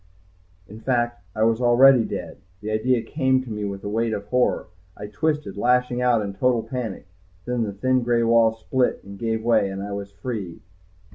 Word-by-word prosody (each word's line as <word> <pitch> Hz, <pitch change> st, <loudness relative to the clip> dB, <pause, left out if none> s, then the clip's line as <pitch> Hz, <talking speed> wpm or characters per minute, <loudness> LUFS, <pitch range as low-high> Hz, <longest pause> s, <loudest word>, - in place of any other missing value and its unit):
In 105 Hz, +2 st, -11 dB
fact 120 Hz, -3 st, -1 dB
I 110 Hz, -, +1 dB
was 115 Hz, +1 st, +2 dB
already 125 Hz, +1 st, +6 dB
dead, -, -, -6 dB, 0.2 s
the 105 Hz, +2 st, -5 dB
idea 115 Hz, +2 st, +1 dB
came 130 Hz, 0 st, +1 dB
to 125 Hz, -, -9 dB
me 105 Hz, -1 st, -3 dB
with 100 Hz, -1 st, -5 dB
a -, -, -4 dB
weight 110 Hz, +2 st, 0 dB
of 100 Hz, -1 st, -4 dB
horror, 125 Hz, 0 st, +1 dB, 0.3 s
I 105 Hz, -, -7 dB
twisted, 145 Hz, 0 st, -2 dB
lashing 125 Hz, +2 st, +1 dB
out 120 Hz, -3 st, +3 dB
in 100 Hz, -1 st, -5 dB
total 120 Hz, +3 st, +1 dB
panic. 115 Hz, -3 st, -5 dB, 0.4 s
Then 125 Hz, -1 st, -1 dB
the 105 Hz, -3 st, -2 dB
thin 130 Hz, +6 st, +1 dB
gray 120 Hz, -1 st, +1 dB
wall 115 Hz, -1 st, +4 dB
split 125 Hz, +3 st, -1 dB
and 100 Hz, 0 st, -11 dB
gave 110 Hz, -1 st, -2 dB
way, 115 Hz, -4 st, +3 dB
and 95 Hz, 0 st, -5 dB
I 100 Hz, -, -6 dB
was 100 Hz, 0 st, -5 dB
free. 100 Hz, -5 st, -6 dB
115 Hz, 195 wpm, -23 LUFS, 105-125 Hz, 0.4 s, already